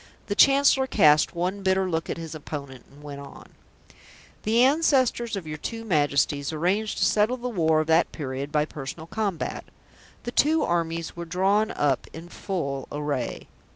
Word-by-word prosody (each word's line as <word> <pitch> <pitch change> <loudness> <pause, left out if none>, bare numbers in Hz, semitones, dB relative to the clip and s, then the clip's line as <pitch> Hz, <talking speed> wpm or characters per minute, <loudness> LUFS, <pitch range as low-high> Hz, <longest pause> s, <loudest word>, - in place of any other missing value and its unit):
The 205 - -2
Chancellor 275 +1 +5
cast 155 -8 +4
one 185 +4 -2
bitter 190 0 +1
look 165 -2 -2
at - - -3
his 165 -1 -7
opponent 140 -4 -8
and 145 +2 -17
went 145 -1 -8
on: 140 - -12 0.9
"The 230 +3 +3
ancestors 260 -5 +2
of 190 -4 -5
your 155 -1 -6
two 225 +7 -6
Majesties 145 -5 +1
arranged 185 +7 -1
to 190 - +2
settle 215 +6 +2
the 250 0 -5
war 160 -7 +2
of - - -3
that 160 +2 +3
period 140 -1 -5
by 150 0 +2
personal 150 +1 -7
combat. 195 -2 -3 0.6
The 240 - -4
two 310 +5 +3
armies 165 -1 -2
were 170 0 -6
drawn 195 +5 +1
up 140 - 0
in 165 +2 -10
full 140 -9 -4
array. 145 -4 -3
170 Hz, 165 wpm, -25 LUFS, 150-215 Hz, 0.9 s, Chancellor